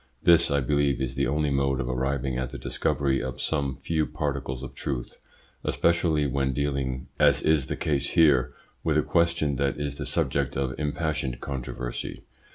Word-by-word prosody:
This, 85 -1 +6
I 70 -1 +2
believe, 70 0 +1
is 65 -1 -2
the 70 +1 0
only 75 +1 +1
mode 70 -1 +1
of 65 - -2
arriving 65 +1 -1
at 65 0 -2
the - - -7
discovery 70 -2 0
of 65 -1 -5
some 70 -4 -1
few 80 +3 0
particles 70 -4 -3
of 65 -1 -7
truth, 65 -3 -4 0.4
especially 85 -3 +2
when 70 -1 0
dealing, 70 -2 -1
as - - +4
is 75 -4 +3
the - - -2
case 70 -2 0
here, 70 -7 +5 0.3
with - - +2
a - - +3
question 85 -4 +1
that 70 +1 0
is 70 -1 -3
the 75 - -4
subject 70 -1 0
of 65 -1 -1
impassioned 75 -4 -2
controversy. 65 -3 -5
70 Hz, 170 wpm, -26 LUFS, 65-75 Hz, 0.4 s, This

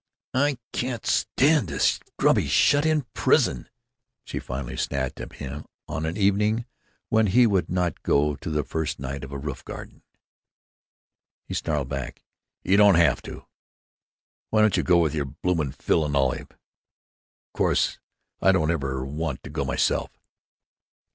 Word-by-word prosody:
"I 140 +1 +2 0.2
can't 120 -2 -3
stand 145 - +2
this 70 -3 +1 0.2
grubby, - - +3
shut 145 +2 +4
in 155 -2 +2
prison," - - +2 0.5
she - - -5
finally 60 0 -5
snapped 65 -2 -2
at - - -8
him, 70 +2 -7 0.2
on 80 +2 -3
an 85 +5 -3
evening 105 +3 +2 0.4
when 110 -1 +3
he 120 +6 +5
would 100 -5 +1
not 90 -3 -1
go 75 +1 +2
to 80 - -6
the 75 -1 0
first 80 +2 -3
night 70 +1 -5
of 70 - -8
a 70 - -4
roof 70 -2 -6
garden. - - -9 1.4
He - - -7
snarled 75 -5 -1
back: 70 -2 -5 0.4
"You 95 - +3
don't 100 -2 +7
have 85 -3 +3
to! - - -10 1.0
Why 110 - +3
don't 110 -1 +4
you - - +2
go 90 -1 +4
with 80 -3 +2
your 75 -2 -1
bloomin' 75 +1 -1
Phil 80 - +1
and 75 -1 -2
Olive? 65 -2 0
Of - - -39
course, - - +1 0.4
I 95 - +5
don't 80 -4 +2
ever 70 -5 -2
want 75 0 -4
to - - -9
go - - -2
myself!" - - 0
80 Hz, 155 wpm, -25 LUFS, 70-105 Hz, 1.4 s, don't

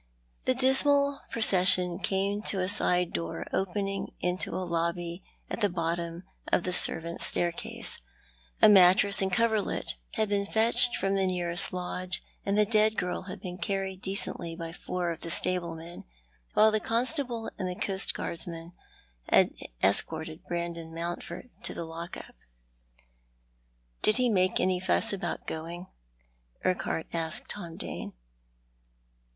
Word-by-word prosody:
The 255 - +2
dismal 280 +2 +3
procession 185 -4 +5
came 200 +1 -1
to 195 - +2
a 185 - 0
side 180 -3 +2
door 85 -1 -3
opening 195 +1 -2
into 180 +1 -1
a 185 - -2
lobby 170 +1 -2 0.2
at - - -5
the 205 - +3
bottom 170 0 -3 0.3
of - - +3
the 180 - -2
servants' 170 0 +1
staircase. 175 -1 -2 0.6
A - - +11
mattress 200 +1 +6
and 190 0 0
a - - +1
coverlet 220 - 0 0.2
had 220 - +1
been 200 -1 0
fetched 235 +3 +5
from 195 0 0
the 195 -1 +2
nearest 175 -1 +1
lodge, 180 0 -2 0.2
and 200 +1 0
the 210 - +5
dead 215 0 +2
girl 180 - -2
had 190 +2 -7
been 180 -1 -7
carried 195 -1 -3
decently 190 -3 -1
by 165 -1 -6
four 175 0 -3
of 165 - -7
the 170 - -5
stablemen, 170 -1 -1 0.5
while 215 +1 +6
the 215 - +1
constable 240 0 0
and 185 -2 -2
the 180 - -4
coastguardsman 170 -3 -2 0.6
had - - +4 0.3
escorted 160 - 0
Brandon 170 -1 -4
Mountford 170 +5 -5
to - - -5
the 170 - -4
lock 165 +2 -7
up. - - -11 1.7
"Did 215 - +4
he 250 -1 +3
make 185 -3 +2
any 185 -1 +1
fuss 185 - +2
about 175 -3 -4
going?" 170 +3 -6 0.7
Urquhart 185 -3 0
asked 165 -1 -3
Tom 170 -5 -7
Dane. - - -6
185 Hz, 140 wpm, -29 LUFS, 170-205 Hz, 1.7 s, A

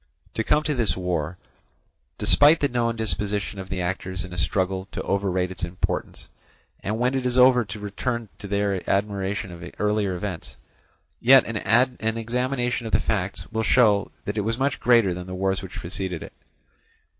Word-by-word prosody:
To 110 - -1
come 150 +6 +2
to 150 - 0
this 115 -8 +1
war: 90 -2 -2 0.8
despite 150 +3 +5
the 145 - +2
known 120 -2 0
disposition 105 -1 -1
of 95 -1 -7
the 95 -2 -2
actors 95 0 -3
in 90 - -10
a - - -7
struggle 95 +2 0
to - - -3
overrate 95 -2 0
its 95 - -6
importance, 85 +1 -3 0.5
and 105 +2 -3
when 125 +3 +1
it 130 -1 -1
is 125 0 0
over 125 -1 +6
to 105 +1 -7
return 115 +3 -3
to 100 - -7
their 100 -1 0
admiration 100 -1 -1
of 85 0 -10
earlier 105 -2 0
events, 90 -7 -6 0.6
yet 130 +1 +7
an 115 0 +1
examination 125 +1 -1
of - - -7
the - - +5
facts 100 -2 -2
will 110 0 -1
show 110 -4 +3
that 105 +1 -2
it - - +2
was 115 +3 -1
much 135 -2 0
greater 115 -6 +4
than 90 +1 -7
the 95 - -5
wars 95 +1 0
which 95 - -9
preceded 90 -1 -4
it. - - -11
105 Hz, 180 wpm, -24 LUFS, 95-120 Hz, 0.8 s, yet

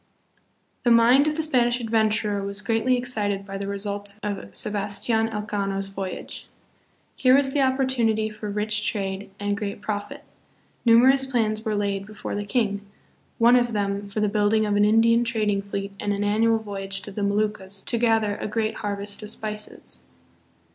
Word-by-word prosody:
The 245 - +3
mind 240 +5 +6
of 305 - 0
the 320 - 0
Spanish 245 -5 +2
adventurer 220 -2 +1
was 200 +1 -4
greatly 230 +4 +1
excited 210 -5 -2
by 195 0 -6
the 200 - -4
results 200 0 -3
of 205 - -4
Sebastian 210 +2 +1
Elcano's 200 -2 -3
voyage. 195 -1 -6 0.7
Here 255 0 +5
was 275 -1 +4
the 285 - +2
opportunity 260 -5 +2
for 215 -1 -7
rich 210 +1 0
trade 195 -1 -4
and 205 0 -1
great 200 -1 -4
profit. 215 +8 -5 0.6
Numerous 260 +4 +6
plans 220 -4 0
were 215 -2 -1
laid 200 -1 -2
before 215 0 -7
the 205 0 -3
king, 205 -2 0 0.6
one 235 +2 +6
of 240 -1 +2
them 200 -1 -2
for 210 +2 -3
the 210 - +2
build 205 +1 +2
ing 215 0 +2
of 205 -1 0
an 205 0 +4
Indian 230 +2 +4
trading 215 -4 0
fleet 200 0 -5
and 205 - -1
an 200 0 -1
annual 225 +2 +3
voyage 195 -2 -4
to 200 - -8
the 205 - -5
Moluccas 200 -1 -1
to 235 - -2
gather 225 -3 +2
a - - -4
great 215 +1 -2
harvest 205 0 -3
of 210 - -7
spices. 210 -1 -6
210 Hz, 170 wpm, -24 LUFS, 200-230 Hz, 0.7 s, mind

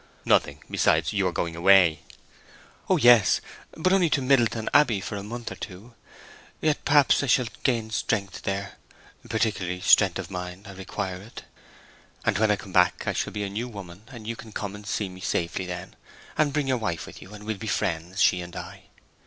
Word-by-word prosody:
"Nothing. - - +2
Besides, - - +2
you - - +1
are - - 0
going 85 -1 -3
away." 85 -2 +5 0.9
"Oh - - +4
yes; 120 -5 +6 0.4
but 185 +4 +2
only 180 -4 +4
to 145 - +2
Middleton 120 -4 +2
Abbey 130 -8 +4
for 100 - -5
a 100 - -4
month 115 +3 -6
or - - -6
two. 105 +5 -9 0.7
Yet 155 -1 0
perhaps 145 -1 +5
I 140 - -2
shall 125 0 +3 0.2
gain 115 -4 0
strength 100 -3 -2
there—particularly 100 -1 -4
strength - - +5
of - - -6
mind—I 90 +3 -7
require 95 0 -5
it. 110 +5 -11 0.8
And - - +2
when 110 0 +3
I 105 - +4
come 100 -3 -11
back 90 -1 +3
I - - 0
shall - - -2
be 105 +1 -3
a 100 - -3
new 115 +5 -3
woman; 100 -3 -10
and 115 -4 -10
you 115 +1 -3
can 110 -1 -11
come 105 -1 -4
and 105 0 -10
see 105 -1 -1
me 90 0 -11
safely 90 +1 -2
then, 90 +1 -7 0.4
and 150 -2 +2
bring 145 -1 -1
your 130 -1 +2
wife 85 -8 -3
with - - -12
you, 95 +3 -11
and 105 - -11
we'll 110 -1 -3
be 110 - -7
friends—she 90 -2 +1
and 85 0 -9
I. - - -9
105 Hz, 195 wpm, -26 LUFS, 95-120 Hz, 0.9 s, yes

